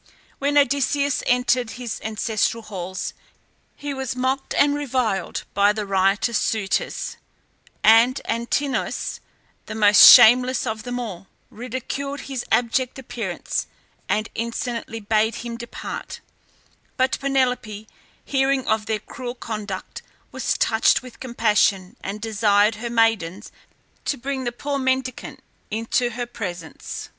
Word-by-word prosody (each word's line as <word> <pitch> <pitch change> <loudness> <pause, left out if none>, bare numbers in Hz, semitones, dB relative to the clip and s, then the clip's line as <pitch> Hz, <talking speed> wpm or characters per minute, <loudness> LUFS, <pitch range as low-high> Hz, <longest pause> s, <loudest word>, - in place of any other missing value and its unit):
When 285 +1 +1
Odysseus 280 0 +2
entered 250 -1 +2
his 245 -3 -5
ancestral 220 +1 -1
halls 185 -3 -5 0.6
he 290 -1 -5
was 265 -1 -4
mocked 260 +2 -1
and 285 0 +4
reviled 250 -10 -1
by 200 +1 +4
the 210 -1 -3
riotous 195 +4 +2
suitors, 210 -4 -1 0.7
and 230 +4 +6
Antinous, 240 +5 -2 0.5
the - - -6
most 210 -1 +6
shameless 250 +3 +7
of 220 -2 -3
them 245 +2 -4
all, 195 -6 -6 0.2
ridiculed 260 +4 -5
his 265 -3 -5
abject 245 +2 +1
appearance, 230 -8 -4 0.4
and 215 +1 +1
insolently 230 0 -4
bade 215 +1 +1
him 235 0 -6
depart; 235 0 -7 0.8
but 260 0 +1
Penelope 250 -6 -1 0.4
hearing 270 -1 +1
of 220 0 0
their 220 -1 0
cruel 245 +2 -7
conduct, 210 -5 -6 0.3
was - - -1
touched 220 +3 +3
with 250 -2 -12
compassion, 210 -6 +1
and 200 +2 -4
desired 210 -1 +2
her 240 - -3
maidens 225 -5 +1 0.5
to 285 - -1
bring 265 +1 -4
the 240 - -1
poor 280 +3 -3
mendicant 260 -1 -2 0.3
into 230 +3 0
her 240 +1 -4
presence. 180 -9 -7
235 Hz, 120 wpm, -22 LUFS, 215-260 Hz, 0.8 s, shameless